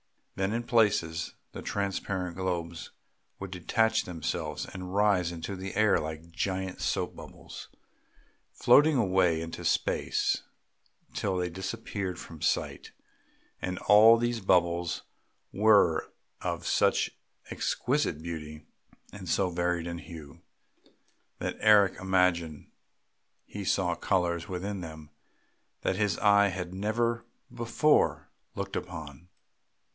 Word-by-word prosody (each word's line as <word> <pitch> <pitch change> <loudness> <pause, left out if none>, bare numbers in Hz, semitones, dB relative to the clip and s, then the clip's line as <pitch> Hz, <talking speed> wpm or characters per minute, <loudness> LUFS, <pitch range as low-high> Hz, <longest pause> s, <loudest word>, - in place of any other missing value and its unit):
Then 95 +1 -1
in 120 +1 -1
places 100 -9 +1 0.2
the - - -7
transparent 95 -3 -2
globes 85 -3 -3 0.5
would 100 -1 -7
detach 110 +5 +1
themselves 85 -3 -3
and 90 -1 -8
rise 100 -4 +3
into 85 +4 -5
the 95 +1 -6
air 105 0 +4
like 80 +2 -6
giant 95 +1 -3
soap - - -1
bubbles, - - -10 0.8
floating 150 0 +5
away 95 -7 +3
into 80 0 -6
space - - +1 0.7
till 95 -2 -1
they 90 -1 -1
disappeared 95 0 -4
from 80 -3 -10
sight; - - -1 0.7
and 90 0 -3
all 110 +3 +7
these 120 0 -1
bubbles 85 -2 +1 0.5
were 100 -6 +4 0.3
of - - -3
such - - +2 0.4
exquisite 125 - -1
beauty, 75 -2 -7 0.5
and 95 -3 -8
so 95 0 +1
varied 85 -1 -1
in 85 0 -4
hue, 80 -5 -11 1.0
that - - -4
Eric 105 -4 +5
imagined 90 -5 0 0.7
he 105 - -7
saw 90 -1 +1
colours 85 -2 0
within 95 +1 -4
them 80 -3 -9 0.7
that 95 - 0
his 105 -4 +1
eye 100 -1 +5
had 90 -1 -4
never 115 +4 0 0.3
before 120 +6 +2 0.2
looked - - -4
upon. 80 -3 -7
95 Hz, 115 wpm, -29 LUFS, 85-100 Hz, 1.0 s, all